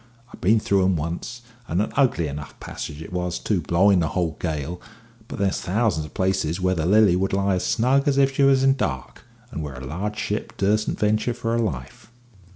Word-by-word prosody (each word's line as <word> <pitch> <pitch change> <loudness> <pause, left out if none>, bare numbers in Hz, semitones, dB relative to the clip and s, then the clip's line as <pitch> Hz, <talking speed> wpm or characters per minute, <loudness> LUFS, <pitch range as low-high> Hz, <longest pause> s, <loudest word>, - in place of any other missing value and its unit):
I've - - -13
been 110 +5 +4
through 100 -2 +2
'em 95 0 +2
once, 85 +10 -4 0.2
and 85 - -1
an 105 - 0
ugly 125 - +2
enough 70 0 -8
passage 75 +2 -7
it 85 - -11
was 90 -1 -2
too, 100 -5 -1
blowing 90 +5 +3
a 80 - +1
whole 85 -3 -1
gale; 80 +1 -3 0.5
but - - -7
there's 100 -1 0
thousands 95 -5 0
of 70 - -18
places 95 -3 0
where 95 0 +1
the 80 -2 -1
Lily 105 -2 +5
would 95 +1 0
lie 100 0 +1
as 90 - -1
snug 130 +5 +2
as 140 -1 +2
if 135 -1 +3
she 140 - 0
was 135 -1 +5
in 135 0 +5
dock, 65 - -4 0.3
but - - -5
where 75 -4 -5
a 65 +1 -8
large 100 +10 -4
ship 105 +1 -3
dursen't 105 +2 +1
venture 110 +3 +1
for 115 -2 -3
her 115 - +1
life." 105 - -4
95 Hz, 215 wpm, -23 LUFS, 85-110 Hz, 0.5 s, Lily